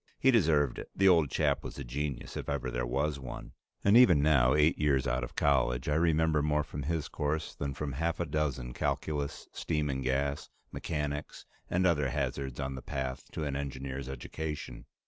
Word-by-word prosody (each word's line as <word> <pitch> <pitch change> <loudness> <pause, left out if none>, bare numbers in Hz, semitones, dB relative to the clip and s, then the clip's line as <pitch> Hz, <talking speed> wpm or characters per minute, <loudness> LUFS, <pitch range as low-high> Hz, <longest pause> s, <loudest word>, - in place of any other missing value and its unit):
He 135 - +4
deserved 75 - +3
it; - - -8
the 95 - +4
old 85 -6 +5
chap - - +1
was - - -7
a 70 - -4
genius 70 +2 -4
if - - -4
ever 65 -3 -2
there - - -2
was 70 +4 0
one, 65 -3 -8 0.3
and 100 +2 +5
even 90 - +7
now, 70 -3 +4
eight 75 +2 +3
years 70 -3 +2
out 65 -1 0
of - - -6
college, 65 -3 +2
I 75 - +2
remember 80 -1 +3
more 75 0 +1
from 75 0 -6
his 80 +1 -2
course 75 +1 -2
than 70 -1 -4
from 75 0 -3
half 80 +5 -1
a 85 - 0
dozen 70 -5 -2
calculus, 75 +1 -2
steam 75 -3 -1
and 65 0 -3
gas, 70 +2 -1 0.2
mechanics, 75 -2 -4 0.2
and 90 +1 +2
other 75 -6 +3
hazards 65 -1 -3
on 65 0 -2
the 65 - -6
path 65 -1 -4
to 80 - -3
an 70 -2 -2
engineer's 70 -1 -4
education. 75 +4 -6
70 Hz, 190 wpm, -31 LUFS, 65-75 Hz, 0.3 s, even